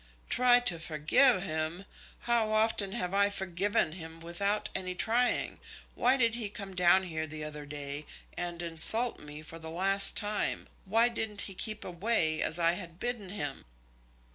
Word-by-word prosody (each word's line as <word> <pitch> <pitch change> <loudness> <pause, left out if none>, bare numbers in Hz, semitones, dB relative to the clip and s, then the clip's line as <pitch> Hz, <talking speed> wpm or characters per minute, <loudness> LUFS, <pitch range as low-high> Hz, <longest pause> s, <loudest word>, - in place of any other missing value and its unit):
"Try 245 0 +6
to 180 -9 +2
forgive 165 - +3
him! 160 +2 -3 0.4
How 235 -2 +1
often 215 -2 +2
have 180 -5 -2
I 200 0 +4
forgiven 190 -2 0
him 160 -1 -9
without 200 +5 -1
any 185 -1 -2
trying? 240 +6 0 0.3
Why 255 +3 +3
did 235 -3 +3
he 225 -3 -3
come 200 -2 -7
down 180 +1 +5
here 160 -3 -3
the 155 0 -6
other 150 -1 -7
day, 145 0 -5 0.3
and 175 0 -4
insult 195 +9 +1
me 150 +1 -10
for 165 +1 -10
the 160 0 -8
last 195 +4 +2
time? 210 -1 0 0.2
Why 225 +5 +4
didn't 220 -3 0
he 195 - -2
keep 215 +3 -3
away, 175 -4 +1
as 160 - -1
I 165 -1 +4
had 170 0 -6
bidden 240 -5 -3
him?" 145 -9 -5
185 Hz, 165 wpm, -30 LUFS, 165-215 Hz, 0.4 s, Try